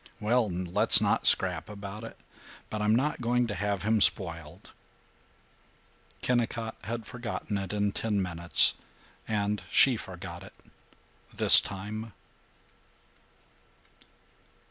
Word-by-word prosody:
"Well, 115 +1 0
let's 90 0 +3
not - - +1
scrap - - +2
about 105 +1 -9
it. 115 - -10 0.5
But 110 - -4
I'm 105 +1 +2
not 140 +3 -1
going 120 +1 0
to 110 - -5
have 105 -1 -3
him 110 0 +1
spoiled." 85 -2 0 1.5
Kennicott 115 -2 -2
had 115 +1 -5
forgotten 120 -3 -6
it 95 -2 -6
in 105 -1 -1
ten 105 0 -2
minutes; 85 -2 +3 0.5
and 105 -1 -2
she 130 -3 +4
forgot 90 -3 -9
it 95 - -14 0.8
this - - +7
time. 105 +3 -7
105 Hz, 110 wpm, -27 LUFS, 95-115 Hz, 1.5 s, this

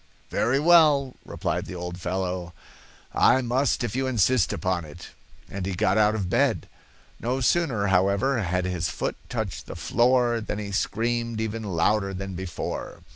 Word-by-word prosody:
'Very 130 +5 +1
well,' 150 -5 +5
replied - - -3
the 90 - -7
old 90 0 -6
follow; 90 -1 -3 0.6
'I 130 - +4
must 125 +2 +1
if 120 -1 -3
you 130 0 0
insist 125 -2 +2
upon 95 -3 -1
it.' 80 +3 -11 0.4
And 100 -1 -5
he 95 0 -3
got 100 0 +2
out 105 0 +3
of 100 -4 -2
bed. - - +1 0.5
No 125 +3 -1
sooner, 130 -6 +1
however, 100 +7 +2
had 90 -1 -1
his 90 -2 -1
foot - - -3
touched - - -4
the - - -7
floor 120 +6 +2
than 105 - -4
he 105 -1 -5
screamed 115 +3 -1
even 110 0 -3
louder 100 +1 0
than 95 +1 -5
before. 90 -2 -5
105 Hz, 160 wpm, -25 LUFS, 90-120 Hz, 0.6 s, well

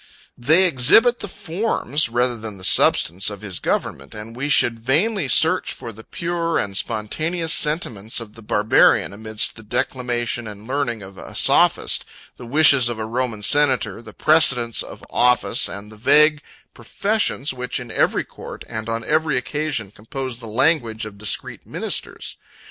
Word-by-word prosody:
25 120 - -13
They 180 +4 +6
exhibit 225 - +4
the - - -6
forms, 170 - -2
rather 120 +1 0
than 110 -3 -8
the 95 - -14
substance, 90 +1 +2
of 100 -2 -9
his 100 -4 -4
government; 70 +6 -3
and 110 +2 -9
we 140 +4 -4
should 115 -4 +2
vainly 160 - 0
search 160 +7 +3
for 120 -3 -8
the 110 +1 -14
pure 170 +2 -3
and 100 -1 -3
spontaneous 155 - -1
sentiments 120 - 0
of 110 -3 -10
the 115 - -14
Barbarian 105 -1 +2
amidst 110 +2 -3
the - - -7
declamation 120 0 -3
and 105 0 -10
learning 130 -5 -2
of 95 0 -12
a - - -11
sophist, - - +3 0.3
the 120 - -11
wishes 140 -2 +6
of 120 - -4
a 110 - -4
Roman 115 -2 -3
senator, 130 -7 +3
the 110 -2 -12
precedents 130 -6 +3
of - - -10
office, 125 -5 +2
and 100 +2 -9
the 110 - -13
vague 150 +5 +4 0.3
professions, 200 -9 -2
which, 125 0 -4
in 120 -2 -9
every - - +1
court, - - -11
and 110 -1 -6
on 115 0 -3
every 155 -2 0
occasion, 135 -5 -3
compose 120 +3 -7
the 115 - -10
language 115 -2 0
of 100 -2 -11
discreet 110 - -3
ministers. - - -4
120 Hz, 165 wpm, -20 LUFS, 110-150 Hz, 0.3 s, They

